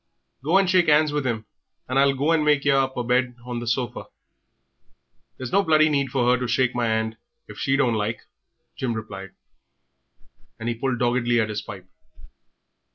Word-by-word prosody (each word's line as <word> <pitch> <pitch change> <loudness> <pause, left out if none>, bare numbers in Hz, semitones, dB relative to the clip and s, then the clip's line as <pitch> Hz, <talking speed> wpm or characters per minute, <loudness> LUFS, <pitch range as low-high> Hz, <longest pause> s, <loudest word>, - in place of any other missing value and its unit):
Go 165 +7 +3
and 195 -1 +3
shake 180 -3 +3
'ands 150 0 +4
with 145 -3 -1
'im, 110 -3 -2 0.4
and 130 +2 +1
I'll 140 0 +4
go 145 +5 +1
and 160 -2 +3
make 150 -2 +2
yer 140 -1 +4
up 135 -1 0
a 125 - -1
bed 125 +1 +1
on 120 -1 -4
the 120 - -7
sofa." 120 +1 -2 1.3
"There's 130 -2 -6
no 200 - +4
bloody 155 -3 +4
need 140 -2 0
for 125 -1 0
'er 125 0 +3
to 125 - -2
shake 120 +1 +1
my 120 -1 0
'and 110 0 -1 0.3
if 105 - -11
she 135 -1 +1
don't 125 -5 +2
like," 110 +1 -2 0.5
Jim 125 -3 -2
replied, 95 -4 -8 1.2
and 110 - -5
he 120 - 0
pulled 125 +2 -2
doggedly 120 0 +1
at 110 -1 0
his 105 0 -3
pipe. 95 -2 -10
125 Hz, 190 wpm, -24 LUFS, 115-140 Hz, 1.3 s, ands